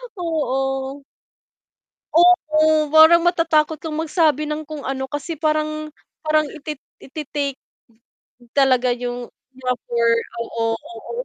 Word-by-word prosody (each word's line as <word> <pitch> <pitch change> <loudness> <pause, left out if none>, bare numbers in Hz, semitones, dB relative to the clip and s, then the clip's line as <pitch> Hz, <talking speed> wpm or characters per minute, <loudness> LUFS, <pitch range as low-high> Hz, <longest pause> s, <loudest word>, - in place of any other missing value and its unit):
oo. 270 -4 -2 1.1
Oo, 310 -3 +4
parang 320 +2 +8
matatakot 320 -3 +2
kang 310 -2 -5
magsabi 315 -2 +1
ng 300 0 -4
kung 305 -2 -7
ano 265 0 -3
kasi 290 +3 -5
parang 310 0 -1 0.4
parang 310 0 +3
iti 305 -1 -6 0.2
itiitake 280 -1 -4 1.0
talaga 255 -3 +3
yung 245 0 -5 0.4
offer, 235 -2 0 0.3
oo, 230 0 -4
oo 230 - -11
305 Hz, 100 wpm, -21 LUFS, 265-315 Hz, 1.1 s, parang